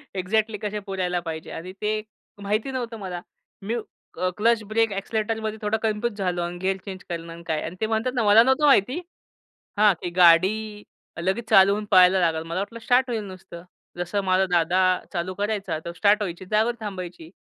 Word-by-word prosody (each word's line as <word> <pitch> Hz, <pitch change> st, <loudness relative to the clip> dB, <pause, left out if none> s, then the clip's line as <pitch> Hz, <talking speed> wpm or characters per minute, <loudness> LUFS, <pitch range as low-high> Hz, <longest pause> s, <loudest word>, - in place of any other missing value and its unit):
Exactly 210 Hz, +3 st, 0 dB
कशा 210 Hz, 0 st, -3 dB
पुरायला 185 Hz, -2 st, -1 dB
पाहिजे. 160 Hz, -2 st, -6 dB
आणि 175 Hz, +3 st, -7 dB
ते 215 Hz, 0 st, 0 dB, 0.4 s
माहिती 215 Hz, +6 st, -1 dB
नव्हतं 240 Hz, -3 st, -4 dB
मला. 180 Hz, -3 st, -5 dB, 0.4 s
मी 215 Hz, +4 st, -3 dB, 0.4 s
अ, 185 Hz, 0 st, +1 dB
क्लच 225 Hz, +1 st, +2 dB
ब्रेक 225 Hz, 0 st, +1 dB
एक्सिलेटरमध्ये 220 Hz, +2 st, -2 dB
थोडा 210 Hz, +1 st, 0 dB
कन्फ्यूज 215 Hz, 0 st, -1 dB
झालो 180 Hz, -3 st, -1 dB
आणि 175 Hz, +1 st, -4 dB
गियर 190 Hz, 0 st, 0 dB
चेंज 190 Hz, -2 st, -7 dB
करणं 165 Hz, -1 st, -5 dB
आणि 170 Hz, 0 st, -12 dB
काय? 155 Hz, -1 st, -1 dB
आणि 165 Hz, -, -6 dB
ते -, -, +2 dB
म्हणतात 225 Hz, +3 st, -1 dB
ना 235 Hz, -, +1 dB
मला 210 Hz, +2 st, +7 dB
नव्हतं 265 Hz, +4 st, +2 dB
माहिती 260 Hz, -, +4 dB, 0.8 s
हा 210 Hz, 0 st, +6 dB
की 175 Hz, -, -3 dB
गाडी 175 Hz, +1 st, +7 dB, 0.7 s
लगेच 195 Hz, +6 st, -2 dB
चालवून 200 Hz, +2 st, +5 dB
पळायला 185 Hz, 0 st, +6 dB
लागेल. 165 Hz, -2 st, +1 dB
मला 170 Hz, +3 st, -3 dB
वाटलं 230 Hz, +4 st, -5 dB
स्टार्ट 250 Hz, +2 st, +2 dB
होईल 225 Hz, -3 st, -2 dB
नुसतं. 185 Hz, -3 st, -10 dB, 0.3 s
जसं 175 Hz, +3 st, -2 dB
माझा 190 Hz, 0 st, +2 dB
दादा 175 Hz, +2 st, +2 dB, 0.3 s
चालू 180 Hz, +1 st, -2 dB
करायचा. 205 Hz, -3 st, -2 dB
तर 170 Hz, -, -4 dB
स्टार्ट 205 Hz, +2 st, +3 dB
व्हायची 185 Hz, -2 st, -4 dB
जागेवर 220 Hz, +4 st, +1 dB
थांबायची. 180 Hz, -5 st, -7 dB
200 Hz, 180 wpm, -24 LUFS, 180-220 Hz, 0.8 s, मला